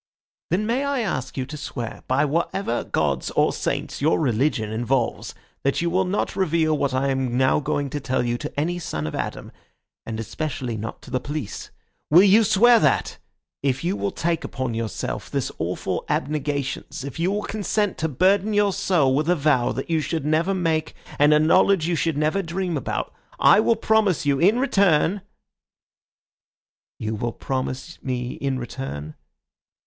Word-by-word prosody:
"Then 190 +6 +1
may 240 +5 0
I 280 -2 0
ask 155 - -3
you 130 - -1
to 150 - -8
swear 120 -5 -6
by 135 +3 +2
whatever 165 -2 -1
gods - - -1
or - - +2
saints - - -3
your 155 +3 +3
religion 125 -5 0
involves 120 +2 -1 0.3
that 140 - 0
you 170 0 0
will 185 +2 +2
not 190 +2 -1
reveal 160 -4 +2
what 140 -2 0
I 130 +1 0
am 130 -2 -1
now 130 +2 +3
going 140 -1 -2
to 145 - -2
tell 130 -2 -1
you 120 0 0
to - - -5
any 175 +4 -1
son 75 - -4
of 75 - -4
Adam, - - -4 0.5
and 115 -1 -5
especially 120 +2 -4
not 110 +1 -6
to - - -12
the 130 - 0
police? 145 -4 -5 0.4
Will 175 +5 +7
you 205 +3 +6
swear 225 +3 +6
that! 145 - +1 0.4
If 135 0 0
you 180 +3 0
will 200 - -1
take 170 -3 -1
upon 130 -3 -3
yourself 115 -1 -4
this - - -2
awful - - -2
abnegation 145 -1 -1 0.2
if 140 +2 -7
you 175 +3 +1
will 205 +1 -1
consent 210 -1 -1
to 160 - 0
burden 190 - +2
your 205 -1 +3
soul 175 -9 +2
with 150 +4 +1
a 180 - +4
vow 140 -5 +2
that 135 +6 -4
you 160 -1 +2
should 155 +1 -3
never 165 +5 +1
make 160 -3 -1 0.2
and 145 +1 +6
a 150 - +6
knowledge 170 +2 +4
you 175 - +1
should 160 0 0
never 155 +6 +1
dream 175 0 -3
about, 140 - -3 0.3
I - - +6
will 230 +1 +3
promise 220 -7 +2
you 140 -1 +2
in 200 +7 +4
return—" 195 - +2 1.8
"You 110 0 -3
will 115 +2 -3
promise 130 +4 -4
me 125 -2 -3
in 135 -1 -2
return?" 75 - -6
150 Hz, 175 wpm, -23 LUFS, 130-185 Hz, 1.8 s, Will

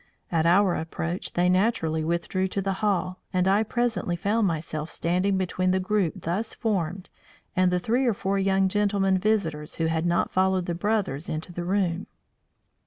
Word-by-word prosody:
At 165 -1 +2
our 185 +1 +4
approach 170 +2 -4
they 175 +1 +2
naturally 180 -5 +1
withdrew 170 +3 -1
to 195 +1 -2
the 195 0 0
hall, 185 -3 0
and 185 0 +1
I 200 +2 +4
presently 220 -5 -1
found 205 +4 +1
myself 155 -2 -3
standing 185 +3 0
between 185 0 0
the 185 +1 +2
group 190 -2 -1
thus 195 +7 -2
formed 190 -4 -2 0.4
and 185 0 +4
the 180 - +2
three 240 +8 +1
or 230 - +2
four 195 0 -1
young 195 0 +2
gentlemen 195 -1 +1
visitors 175 -8 0
who 165 - -1
had 160 +1 0
not 170 0 +1
followed 190 -1 +2
the 175 - -2
brothers 185 -5 -1
into 160 +3 -5
the 175 - -4
room. 185 -1 0
185 Hz, 175 wpm, -26 LUFS, 170-200 Hz, 0.4 s, our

